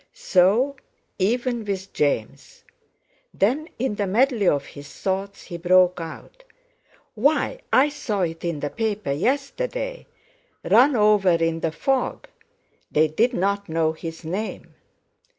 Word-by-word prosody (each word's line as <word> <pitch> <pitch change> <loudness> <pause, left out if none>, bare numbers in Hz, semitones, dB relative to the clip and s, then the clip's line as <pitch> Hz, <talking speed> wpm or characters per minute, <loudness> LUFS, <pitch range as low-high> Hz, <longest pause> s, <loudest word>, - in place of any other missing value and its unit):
So 250 - +2 0.4
even 240 +4 0
with 195 -2 -5
James! 140 -7 -2 0.7
Then 270 +11 +1
in 255 -2 -1
the 205 -1 -2
medley 230 0 +2
of 140 -3 +2
his 145 0 -11
thoughts, 195 +1 -3
he 175 - -7
broke 180 0 +3
out: 165 - -10 0.7
"Why 290 - +1
I 275 +3 +5
saw 215 -8 -3
it 165 -2 -3
in 170 -4 -3
the 145 - -3
paper 215 -8 -2
yesterday: - - -2 0.6
'Run 270 +2 +5
over 210 -3 +4
in 165 -1 +1
the 165 - -1
fog!' 265 - -1 0.6
They 155 +1 +3
didn't 200 +2 +1
know 160 0 +1
his 165 +1 -8
name!" 195 +7 -5
200 Hz, 125 wpm, -23 LUFS, 165-250 Hz, 0.7 s, I